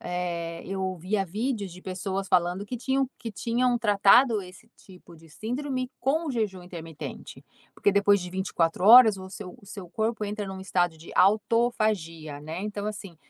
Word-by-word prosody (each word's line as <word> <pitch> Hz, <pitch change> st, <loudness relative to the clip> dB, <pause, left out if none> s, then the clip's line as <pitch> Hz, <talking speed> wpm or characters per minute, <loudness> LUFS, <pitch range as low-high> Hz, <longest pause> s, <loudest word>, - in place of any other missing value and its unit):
eh, 170 Hz, -2 st, -4 dB
eu 195 Hz, 0 st, -4 dB
ouvia 185 Hz, +2 st, -1 dB
vídeos 205 Hz, 0 st, -3 dB
de 180 Hz, -, -13 dB
pessoas 190 Hz, +1 st, -4 dB
falando 180 Hz, +2 st, +1 dB
que 245 Hz, -, -5 dB
tinham 265 Hz, +2 st, 0 dB
que 230 Hz, -, -6 dB
tinham 245 Hz, +3 st, +1 dB
tratado 215 Hz, +2 st, +5 dB
esse 185 Hz, +6 st, -14 dB
tipo 180 Hz, -3 st, -16 dB
de 165 Hz, +1 st, -18 dB
síndrome 255 Hz, -, -4 dB
com 305 Hz, +3 st, 0 dB
jejum 210 Hz, -7 st, -2 dB
intermitente, 165 Hz, -3 st, -9 dB, 0.3 s
porque 205 Hz, -, +2 dB
depois 200 Hz, 0 st, +4 dB
de 180 Hz, 0 st, -6 dB
24 180 Hz, -2 st, -1 dB
horas 225 Hz, -3 st, +9 dB
o 190 Hz, 0 st, -9 dB
seu 190 Hz, -1 st, -9 dB
o 200 Hz, -, -19 dB
seu 195 Hz, -3 st, -9 dB
corpo 220 Hz, +3 st, -2 dB
entra 205 Hz, 0 st, -4 dB
num 190 Hz, 0 st, -7 dB
estado 175 Hz, -3 st, 0 dB
de 160 Hz, -, -13 dB
autofagia, 205 Hz, -7 st, +1 dB
né, 160 Hz, +5 st, -6 dB
então, 210 Hz, 0 st, -4 dB
assim, 200 Hz, -5 st, -7 dB
195 Hz, 165 wpm, -26 LUFS, 180-220 Hz, 0.3 s, horas